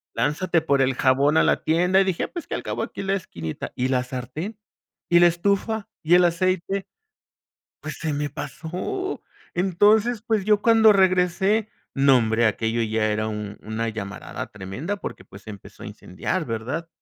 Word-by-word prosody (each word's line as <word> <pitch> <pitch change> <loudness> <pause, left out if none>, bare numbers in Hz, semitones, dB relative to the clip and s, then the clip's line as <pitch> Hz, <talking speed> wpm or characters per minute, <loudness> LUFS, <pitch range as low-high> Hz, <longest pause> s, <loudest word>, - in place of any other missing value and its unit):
Lánzate 165 +2 +1
por 140 -3 +2
el 130 0 +1
jabón 140 +4 +3
a - - +6
la - - +2
tienda 180 +4 +3
y - - +4
dije: 185 -3 -1
"Pues, 345 -2 -7
qué, - - -4
al - - -2
acabó - - -4
aquí - - -5
la 195 0 0
esquinita". 80 - -6
¿Y 125 +1 -1
la 125 -1 +1
sartén? 130 - -6 0.5
¿Y 175 0 +5
la 175 - +7
estufa? 200 +5 -1
¿Y 165 +3 +4
el 180 0 +6
aceite? 185 +2 0 0.9
Pues, - - -6
se 160 -2 -2
me 145 0 -2
pasó. 175 - -5 0.3
Entonces, 205 +5 +3
pues, 220 -4 0
yo 210 -1 +3
cuando 225 -2 +6
regresé, 190 +3 +2 0.3
no, 135 -2 +5
hombre, 110 0 +2
aquello 115 +2 0
ya 110 0 0
era 110 +1 -1
un 105 -1 -6
una 110 +1 -3
llamarada 105 -3 -6
tremenda 105 - -5
porque, 95 - -7
pues, 100 +1 -14
se 110 - -9
empezó 100 -2 -12
a - - -7
incendiar, 160 - -4
¿verdad? 130 +9 -4
160 Hz, 175 wpm, -23 LUFS, 115-195 Hz, 0.9 s, la